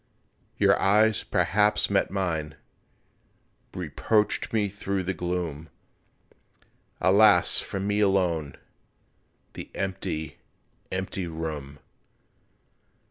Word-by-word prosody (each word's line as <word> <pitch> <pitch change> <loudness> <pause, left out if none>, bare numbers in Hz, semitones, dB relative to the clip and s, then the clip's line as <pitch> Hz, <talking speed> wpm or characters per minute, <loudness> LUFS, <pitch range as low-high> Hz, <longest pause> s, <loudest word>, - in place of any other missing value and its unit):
Your - - +3
eyes 105 +2 +3
perhaps 105 +3 +2
met 100 - +2
mine, 80 -6 -2 1.2
Reproached 105 -2 0
me 105 -2 +1
through 100 -1 -3
the 95 +2 -2
gloom, 85 -4 -4 1.3
Alas, 100 -1 +5
for 100 - -4
me 105 +2 -1
alone 90 -8 +1 1.0
The - - -8
empty, 95 -5 -4 0.5
empty 95 -1 -3
room! 75 -4 -6
95 Hz, 80 wpm, -26 LUFS, 80-100 Hz, 1.3 s, Alas